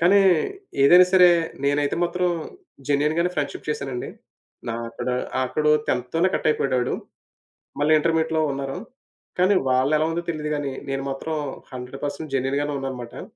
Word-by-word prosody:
కానీ 185 Hz, +4 st, +5 dB, 0.6 s
ఏదైనా 180 Hz, +6 st, +8 dB
సరే 180 Hz, -1 st, +8 dB, 0.4 s
నేనైతే 145 Hz, +1 st, +1 dB
మాత్రం 180 Hz, +1 st, +1 dB, 0.6 s
జెన్యూన్ 145 Hz, +2 st, +2 dB
గానే 175 Hz, +1 st, +2 dB
ఫ్రెండ్‌షిప్ 145 Hz, 0 st, -4 dB
చేశానండి. 135 Hz, -4 st, -3 dB, 0.6 s
నా 115 Hz, -, -2 dB
అక్కడ 115 Hz, -, -6 dB, 0.4 s
అక్కడ 130 Hz, +4 st, -2 dB, 0.2 s
టెన్త్ 125 Hz, 0 st, -1 dB
తోనే 170 Hz, +3 st, +3 dB
కటయిపోయాడాడు. 130 Hz, -5 st, +1 dB, 0.9 s
మళ్ళీ 155 Hz, +1 st, +4 dB
ఇంటర్మీడియేట్‌లో 160 Hz, 0 st, +1 dB
ఉన్నారు. 135 Hz, +4 st, -4 dB, 0.6 s
కానీ 190 Hz, +2 st, +4 dB
వాళ్ళేలా 140 Hz, +5 st, +2 dB
ఉందో 170 Hz, +1 st, -2 dB
తెలీదు 150 Hz, -2 st, -3 dB
గాని 145 Hz, -2 st, -3 dB, 0.2 s
నేను 135 Hz, 0 st, -2 dB
మాత్రం 155 Hz, +4 st, -4 dB, 0.4 s
100 125 Hz, +2 st, -8 dB
పర్సెంట్ 145 Hz, 0 st, -5 dB
జెన్యూన్‌గానే 140 Hz, +3 st, 0 dB
ఉన్నానన్నమాట. 125 Hz, -3 st, -6 dB
145 Hz, 130 wpm, -23 LUFS, 135-165 Hz, 0.9 s, ఏదైనా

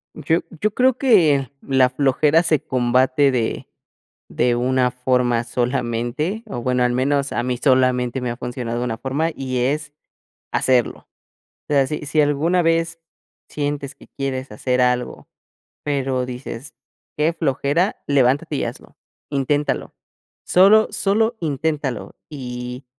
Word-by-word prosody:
Yo 165 Hz, +1 st, +1 dB, 0.2 s
yo 215 Hz, +4 st, +1 dB
creo 255 Hz, +1 st, +3 dB
que 160 Hz, -, +3 dB
la 130 Hz, -2 st, +3 dB
flojera 145 Hz, +4 st, +3 dB
se 155 Hz, -3 st, +2 dB
combate 130 Hz, +1 st, +2 dB
de 120 Hz, -3 st, -2 dB, 0.6 s
de 120 Hz, 0 st, +1 dB
una 125 Hz, +1 st, +1 dB
forma 125 Hz, -1 st, +1 dB
solamente, 125 Hz, -, -2 dB
o 155 Hz, -, -5 dB
bueno 125 Hz, +1 st, +1 dB
al 125 Hz, 0 st, +1 dB
menos 140 Hz, +2 st, 0 dB
a 120 Hz, -, -1 dB
mí 125 Hz, 0 st, -1 dB
solamente 130 Hz, -1 st, +2 dB
me 125 Hz, -1 st, -2 dB
ha 120 Hz, -, -6 dB
funcionado 120 Hz, -1 st, -4 dB
una 115 Hz, -2 st, -3 dB
forma, 140 Hz, +6 st, -1 dB
y 130 Hz, -1 st, -3 dB
es 145 Hz, +4 st, -1 dB, 0.6 s
hacerlo. 125 Hz, -3 st, +1 dB, 0.6 s
O -, -, 0 dB
sea 135 Hz, -2 st, +3 dB
si 150 Hz, 0 st, -4 dB
si 150 Hz, +2 st, 0 dB
alguna 150 Hz, +5 st, +2 dB
vez 165 Hz, 0 st, 0 dB, 0.5 s
sientes 145 Hz, -1 st, -3 dB
que -, -, -17 dB
quieres 135 Hz, -2 st, -3 dB
hacer 125 Hz, +4 st, 0 dB
algo, 125 Hz, -1 st, -1 dB, 0.6 s
pero 135 Hz, -3 st, -1 dB
dices: 125 Hz, +1 st, -7 dB, 0.4 s
"Qué 155 Hz, +3 st, +2 dB
flojera", 160 Hz, -, 0 dB
levántate 135 Hz, -1 st, +2 dB
y -, -, -1 dB
hazlo, -, -, -9 dB, 0.3 s
inténtalo, 145 Hz, +1 st, -1 dB, 0.5 s
solo 205 Hz, +4 st, +6 dB
solo 220 Hz, +3 st, +1 dB
inténtalo 150 Hz, -4 st, -2 dB
y 125 Hz, -2 st, -7 dB
135 Hz, 135 wpm, -21 LUFS, 125-150 Hz, 0.6 s, solo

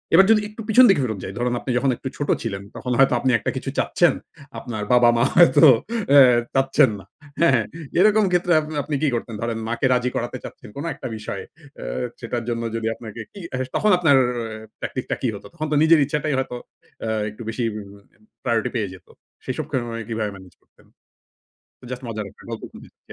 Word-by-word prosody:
এবার 190 Hz, +3 st, +8 dB
যদি 215 Hz, -1 st, +5 dB
একটু 215 Hz, +2 st, -9 dB
পিছন 250 Hz, +4 st, +7 dB
দিকে 175 Hz, -8 st, +4 dB
ফেরত 110 Hz, -4 st, -2 dB
যাই, 95 Hz, -, -6 dB
ধরুন 120 Hz, 0 st, 0 dB
আপনি 130 Hz, -, -4 dB
যখন 135 Hz, +2 st, +1 dB
একটু 130 Hz, -, -7 dB
ছোট 145 Hz, -, -3 dB
ছিলেন 100 Hz, -4 st, -4 dB
তখন 125 Hz, -, -4 dB
হয়তো 135 Hz, -, +5 dB
আপনি 130 Hz, -, +1 dB
একটা -, -, -2 dB
কিছু -, -, -4 dB
চাচ্ছেন। -, -, +3 dB, 0.5 s
আপনার 110 Hz, -4 st, -5 dB
বাবা-মা 120 Hz, -1 st, +5 dB
হয়তো 170 Hz, -1 st, +7 dB, 0.5 s
আ -, -, +9 dB, 0.4 s
চাচ্ছেন 135 Hz, -2 st, +4 dB
না। -, -, -14 dB, 0.4 s
হ্যাঁ? 130 Hz, -9 st, +4 dB, 0.4 s
এরকম 215 Hz, +2 st, +5 dB
ক্ষেত্রে 175 Hz, -1 st, +2 dB
আপনে 155 Hz, 0 st, -7 dB
আপনি 150 Hz, 0 st, -3 dB
কি 155 Hz, -, +2 dB
করতেন? 115 Hz, -1 st, -4 dB
ধরেন 115 Hz, -1 st, -2 dB
মাকে 120 Hz, +3 st, -1 dB
রাজি 125 Hz, 0 st, +1 dB
করাতে -, -, -3 dB
চাচ্ছেন -, -, -10 dB
কোনো 145 Hz, +4 st, -4 dB
একটা 135 Hz, -1 st, -7 dB
বিষয়ে। 105 Hz, -, -6 dB, 0.4 s
আ -, -, -6 dB, 0.4 s
সেটার 120 Hz, 0 st, -4 dB
জন্য 115 Hz, -1 st, -2 dB
যদি 115 Hz, -1 st, -2 dB
আপনাকে 115 Hz, -1 st, -9 dB
কি -, -, -11 dB, 0.4 s
তখন 215 Hz, -, +3 dB
আপনার 160 Hz, -6 st, +4 dB, 0.6 s
ট্যাকটিক 130 Hz, -, -4 dB
টা -, -, +2 dB
কি 130 Hz, -, 0 dB
হতো? 100 Hz, -, -10 dB
তখন 155 Hz, 0 st, -4 dB
তো -, -, +2 dB
নিজের 160 Hz, 0 st, +6 dB
ইচ্ছাটাই 150 Hz, +1 st, -1 dB
হয়তো 130 Hz, -2 st, -2 dB, 0.5 s
আ -, -, -3 dB, 0.2 s
একটু 105 Hz, +2 st, -12 dB
বেশি 115 Hz, +2 st, -3 dB
এম 110 Hz, -, -6 dB, 0.7 s
প্রায়োরিটি 115 Hz, -3 st, 0 dB
পেয়ে 105 Hz, -5 st, -1 dB
যেত। 95 Hz, -, -15 dB, 0.4 s
সেসব -, -, -3 dB
কারণে 120 Hz, -3 st, -2 dB
কিভাবে 110 Hz, -2 st, -2 dB
মেনেজ 95 Hz, -2 st, -14 dB
করতেন? -, -, -27 dB, 1.1 s
জাস্ট 125 Hz, 0 st, -6 dB
মজার 110 Hz, -2 st, -4 dB
একটা -, -, -19 dB
গল্প -, -, -6 dB
বলুন। -, -, -12 dB, 0.3 s
জি। -, -, -7 dB
125 Hz, 195 wpm, -22 LUFS, 115-150 Hz, 1.1 s, আ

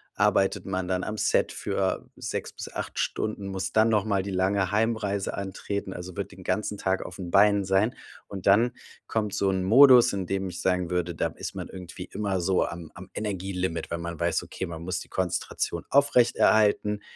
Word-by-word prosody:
arbeitet 95 Hz, 0 st, +2 dB
man 95 Hz, -1 st, -3 dB
dann 90 Hz, 0 st, 0 dB
am 110 Hz, 0 st, -4 dB
Set -, -, +1 dB
für -, -, -1 dB
6 -, -, -4 dB
bis -, -, -7 dB
8 -, -, -5 dB
Stunden, 105 Hz, -2 st, -2 dB
muss 95 Hz, -2 st, -3 dB
dann 110 Hz, +1 st, +4 dB
noch 105 Hz, -3 st, +2 dB
mal 100 Hz, -2 st, +1 dB
die 100 Hz, +1 st, -5 dB
lange 95 Hz, 0 st, +1 dB
Heimreise 105 Hz, -2 st, 0 dB
antreten, 100 Hz, 0 st, -4 dB
also 90 Hz, +1 st, -8 dB
wird 100 Hz, 0 st, -4 dB
den 95 Hz, +1 st, -12 dB
ganzen 105 Hz, +1 st, -1 dB
Tag 95 Hz, -1 st, -1 dB
auf 90 Hz, -, -8 dB
'n 85 Hz, -2 st, -6 dB
Beinen 100 Hz, 0 st, +5 dB
sein. 95 Hz, +6 st, +2 dB, 0.3 s
Und 95 Hz, -3 st, -8 dB
dann 115 Hz, +5 st, +4 dB, 0.3 s
kommt 105 Hz, -3 st, -1 dB
so 100 Hz, -, +1 dB
'n 95 Hz, -1 st, 0 dB
Modus, 125 Hz, +4 st, +7 dB
in 95 Hz, -2 st, -3 dB
dem 95 Hz, 0 st, -2 dB
ich 90 Hz, 0 st, -6 dB
sagen 90 Hz, -2 st, +1 dB
würde, 90 Hz, -1 st, -1 dB
da -, -, 0 dB
ist -, -, -6 dB
man -, -, -6 dB
irgendwie 90 Hz, -1 st, -8 dB
immer 100 Hz, -3 st, -1 dB
so 95 Hz, +1 st, +2 dB
am 85 Hz, -2 st, -7 dB
am 95 Hz, +2 st, -11 dB
Energielimit, 95 Hz, -5 st, -3 dB
wenn 85 Hz, 0 st, -2 dB
man 85 Hz, -2 st, -5 dB
weiß, -, -, +1 dB
okay, -, -, -5 dB
man 85 Hz, -2 st, -7 dB
muss 90 Hz, +1 st, -2 dB
die -, -, -10 dB
Konzentration 90 Hz, -2 st, -2 dB
aufrechterhalten, 110 Hz, -6 st, +3 dB
95 Hz, 195 wpm, -27 LUFS, 90-105 Hz, 0.3 s, Modus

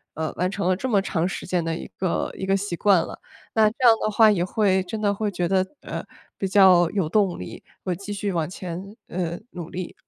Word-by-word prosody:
呃， 160 Hz, 0 st, -3 dB
完 180 Hz, +1 st, +1 dB
成 195 Hz, -1 st, -2 dB
了 185 Hz, -, +3 dB
这 260 Hz, +8 st, -3 dB
么 205 Hz, -4 st, +4 dB
长 175 Hz, -3 st, -1 dB
时 190 Hz, -, -5 dB
间 180 Hz, -2 st, 0 dB
的 165 Hz, 0 st, -2 dB
一 -, -, -7 dB
个 185 Hz, -2 st, -1 dB
一 190 Hz, -, -3 dB
个 195 Hz, -, +3 dB
习 195 Hz, -2 st, -3 dB
惯 195 Hz, 0 st, +4 dB
了。 -, -, -8 dB, 0.3 s
那 220 Hz, -1 st, +5 dB
这 215 Hz, -, -13 dB
样 230 Hz, -, +9 dB
的 215 Hz, -, +1 dB
话 220 Hz, +1 st, +6 dB
也 180 Hz, -4 st, +1 dB
会 190 Hz, 0 st, +2 dB
真 215 Hz, +4 st, -5 dB
的 205 Hz, -1 st, +2 dB
会 210 Hz, +1 st, -1 dB
觉 175 Hz, -3 st, -1 dB
得， 190 Hz, 0 st, +3 dB, 0.2 s
呃， -, -, -5 dB, 0.4 s
比 195 Hz, -, 0 dB
较 185 Hz, -3 st, +6 dB
有 195 Hz, -4 st, -1 dB
动 195 Hz, +1 st, +1 dB
力， 90 Hz, -, -8 dB, 0.2 s
会 180 Hz, -2 st, -1 dB
继 200 Hz, +3 st, -8 dB
续 200 Hz, 0 st, -2 dB
往 165 Hz, -2 st, -1 dB
前， 185 Hz, +3 st, -7 dB
呃， 175 Hz, -1 st, -3 dB
努 175 Hz, -2 st, -7 dB
力。 180 Hz, 0 st, -6 dB
190 Hz, 255 characters per minute, -24 LUFS, 175-205 Hz, 0.4 s, 样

